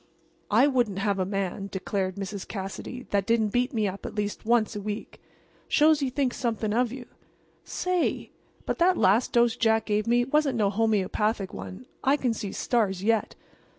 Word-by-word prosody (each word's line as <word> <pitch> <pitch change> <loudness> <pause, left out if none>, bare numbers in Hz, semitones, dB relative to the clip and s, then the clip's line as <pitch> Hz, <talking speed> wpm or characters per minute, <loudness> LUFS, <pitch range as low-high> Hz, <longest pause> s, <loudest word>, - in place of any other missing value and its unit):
"I 230 +6 +5
wouldn't 245 -8 +1
have 200 -1 0
a 185 - 0
man," 195 0 -3
declared 190 -1 -2
Mrs. 195 0 -5
Cassidy, 200 +5 -6
"that 200 -1 +1
didn't 230 -2 +2
beat 245 +4 0
me 215 -3 0
up 195 +1 -6
at - - -6
least 210 +1 -3
once 230 -2 +2
a 205 - -4
week. 210 +2 -6 0.5
Shows 310 0 +4
he 275 -3 0
thinks 260 -1 -1
something 225 -3 -1
of 240 0 +1
you. 260 -1 -7 0.6
Say! 365 -1 -1 0.3
but - - -2
that 360 +1 +4
last 210 +7 +3
dose 235 -1 +3
Jack 220 -1 +2
gave 210 +1 0
me 240 +1 +3
wasn't 275 -1 +1
no 205 -3 +2
homeopathic 210 -1 0
one. 95 +4 -8 0.2
I 275 +2 +3
can 250 -4 0
see 210 -3 -5
stars 200 -6 0
yet. 225 0 +1
220 Hz, 180 wpm, -27 LUFS, 200-245 Hz, 0.6 s, I